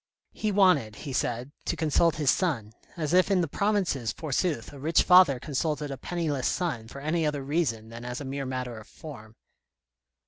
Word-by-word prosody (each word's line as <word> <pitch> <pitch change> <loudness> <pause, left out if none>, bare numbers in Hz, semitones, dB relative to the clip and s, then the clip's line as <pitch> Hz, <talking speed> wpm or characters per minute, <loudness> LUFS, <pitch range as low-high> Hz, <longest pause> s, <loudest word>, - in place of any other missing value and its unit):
He 215 - -1
wanted, 180 - +3
he 140 +2 -7
said, 125 +1 -2
to - - -1
consult 160 +1 +2
his 150 -4 +3
son, 125 - -1 0.2
as 155 -1 -2
if 185 +2 +5
in 190 -2 +3
the 170 - 0
provinces, 185 - 0
forsooth, 150 -4 -2
a 140 - -10
rich 155 +4 +3
father 180 -8 +6
consulted 150 +1 -2
a - - -3
penniless 155 -6 -2
son 155 -12 -2
for 140 +4 -9
any 160 +3 0
other 150 -2 -1
reason 135 -7 -1
than 115 +1 -9
as 125 0 -5
a 145 - -6
mere 135 0 -4
matter 125 -3 -4
of 110 - -14
form. 115 -8 -11
145 Hz, 185 wpm, -27 LUFS, 125-170 Hz, 0.2 s, father